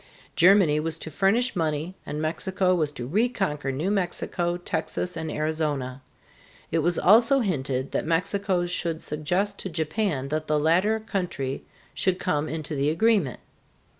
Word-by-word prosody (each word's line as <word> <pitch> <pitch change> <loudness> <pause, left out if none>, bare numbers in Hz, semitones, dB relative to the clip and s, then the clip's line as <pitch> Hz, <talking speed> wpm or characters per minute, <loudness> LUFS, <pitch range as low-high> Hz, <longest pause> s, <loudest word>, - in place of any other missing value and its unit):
Germany 175 -4 +5
was 160 +1 -2
to 160 - -7
furnish 205 - +2
money 160 0 -1
and 150 - -4
Mexico 185 +4 0
was 155 -5 +1
to 120 - -6
reconquer 190 - 0
New 155 +9 -1
Mexico, 175 -2 -1
Texas, 175 +1 -3
and 160 -1 -4
Arizona. 150 -4 -2 0.7
It 165 - +2
was 170 +2 +1
also 230 +7 +5
hinted 135 - -1
that - - -2
Mexico 180 +2 +1
should 170 -2 -2
suggest 180 +7 -1
to 190 - -5
Japan 160 -3 -1
that 155 +1 -2
the 150 - +2
latter 180 +8 +3
country 180 -11 -3 0.3
should 185 -1 0
come 155 -5 -1
into 155 -1 -4
the 140 0 +1
agreement. 175 - +2
165 Hz, 145 wpm, -26 LUFS, 150-190 Hz, 0.7 s, Germany